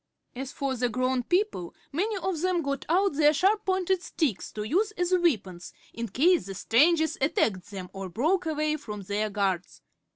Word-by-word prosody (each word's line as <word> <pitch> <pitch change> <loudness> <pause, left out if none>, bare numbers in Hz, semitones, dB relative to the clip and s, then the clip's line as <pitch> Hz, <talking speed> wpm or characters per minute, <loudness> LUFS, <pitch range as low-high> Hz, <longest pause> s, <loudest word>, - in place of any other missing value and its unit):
As 265 +2 -5
for 275 -1 -2
the 245 0 0
grown 255 +2 0
people, 350 - -1 0.2
many 400 +8 -1
of 365 -3 -2
them 360 -2 +1
got 280 -1 -3
out 380 +2 +3
their 295 +1 +4
sharp 415 +6 +2
pointed 375 -1 +1
sticks 290 - -2
to 210 - -4
use 370 - +1
as 355 -1 -1
weapons 210 - 0 0.2
in 235 0 -4
case 335 - +3
the 195 - -6
strangers 315 - +3
attacked 210 - +1
them 190 -3 -7
or 195 -1 -6
broke 320 - 0
away 305 0 0
from 210 -8 -7
their 205 +3 -1
guards. 195 -3 -2
285 Hz, 175 wpm, -27 LUFS, 210-355 Hz, 0.2 s, their